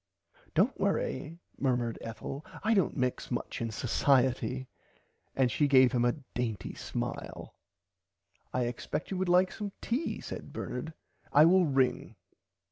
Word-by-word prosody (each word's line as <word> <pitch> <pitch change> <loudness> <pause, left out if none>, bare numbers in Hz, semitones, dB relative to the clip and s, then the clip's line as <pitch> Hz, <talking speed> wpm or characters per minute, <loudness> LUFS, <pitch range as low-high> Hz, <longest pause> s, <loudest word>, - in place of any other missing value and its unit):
Dont - - +3
worry 150 +5 -1 0.2
murmered 120 -4 0
Ethel 115 +6 -6 0.2
I 220 +2 +3
dont 195 -7 +2
mix 125 -1 -1
much 120 - -3
in 115 - 0
Socierty 130 +2 +1 0.7
and 130 -2 +3
she 145 +6 +2
gave 130 -3 +6
him 120 -2 +2
a 120 - +3 0.2
dainty 110 -6 -3
smile. - - -5 1.0
I 130 - 0
expect 125 +7 -3
you 190 - -1
would 190 -1 0
like 180 +1 +5
some 205 -2 -5
tea 250 +8 -2
said - - -7
Bernard 155 +6 -5 0.4
I 150 +2 +7
will 180 0 +5
ring. 135 -2 +1
130 Hz, 135 wpm, -30 LUFS, 125-165 Hz, 1.0 s, I